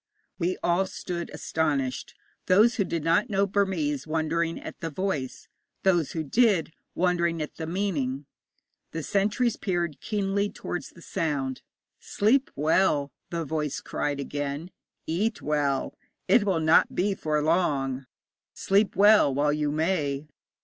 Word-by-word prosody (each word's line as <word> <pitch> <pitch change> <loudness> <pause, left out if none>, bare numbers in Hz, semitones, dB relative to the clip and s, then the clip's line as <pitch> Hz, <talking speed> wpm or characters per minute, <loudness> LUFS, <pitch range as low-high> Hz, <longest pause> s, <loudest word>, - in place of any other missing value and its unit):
We 180 +1 0
all 180 +2 +2
stood 175 -2 -5
astonished 140 -5 -2 0.3
those 215 +6 +5
who 200 - +3
did 170 -4 -3
not 170 +9 +2
know 200 -1 +2
Burmese 175 -8 0
wondering 165 +1 -1
at - - -9
the 165 - -3
voice; 155 -6 -3 0.4
those 175 -6 +2
who 160 - -2
did, 190 - +2 0.2
wondering 170 -2 +1
at 150 - -5
the 160 - -4
meaning. 150 -8 -2 0.7
The 160 -1 -3
sentries 210 +6 +1
peered 175 -6 -2
keenly 200 0 0
towards 175 - -5
the 170 - -16
sound. 140 -5 -2 0.4
'Sleep 255 +7 +2
well,' 150 -1 +2 0.2
the 170 -1 -3
voice 150 -1 -2
cried 145 -1 -3
again; 145 +4 -4 0.3
'eat 210 +7 -1
well. 145 -2 0 0.3
It 200 +2 +5
will 190 -5 +1
not 155 +1 +4
be 200 +3 +1
for 155 -5 -1
long. 140 -6 0 0.5
Sleep 200 +1 +2
well 205 -7 +6
while 145 +2 +1
you 150 -1 0
may.' 155 -3 0
165 Hz, 135 wpm, -27 LUFS, 150-195 Hz, 0.7 s, well